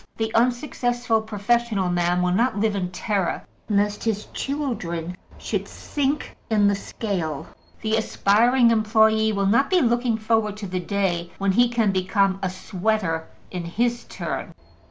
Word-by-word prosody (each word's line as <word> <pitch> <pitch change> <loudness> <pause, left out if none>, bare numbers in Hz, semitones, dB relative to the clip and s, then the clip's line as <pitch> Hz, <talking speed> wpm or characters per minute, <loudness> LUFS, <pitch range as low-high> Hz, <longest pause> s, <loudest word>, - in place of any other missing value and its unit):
The 220 0 -2
unsuccessful 245 -1 +1
professional 220 -1 0
man 175 0 +1
will 180 - +2
not 230 +3 +1
live 215 -1 +1
in 185 -2 -2
terror 190 0 -2 0.2
lest 205 0 +1
his 215 -2 -1
children 180 - -3 0.2
should - - -3
sink 290 +1 -2
in 210 -2 +4
the 200 - +3
scale; 185 -7 -3 0.4
the 220 0 +1
aspiring 230 +3 +3
employe 220 0 +3
will 200 -1 0
not 235 +8 +3
be 370 - +4
looking 240 -4 +2
forward 220 -2 0
to 210 - -6
the 185 -1 -3
day 175 -2 -1
when 195 0 +1
he 240 +5 +4
can 230 -4 +2
become 190 +1 +1
a 190 - 0
sweater 185 -3 -1 0.2
in 180 -2 -4
his 235 +7 -1
turn. - - -5
215 Hz, 150 wpm, -23 LUFS, 190-235 Hz, 0.4 s, in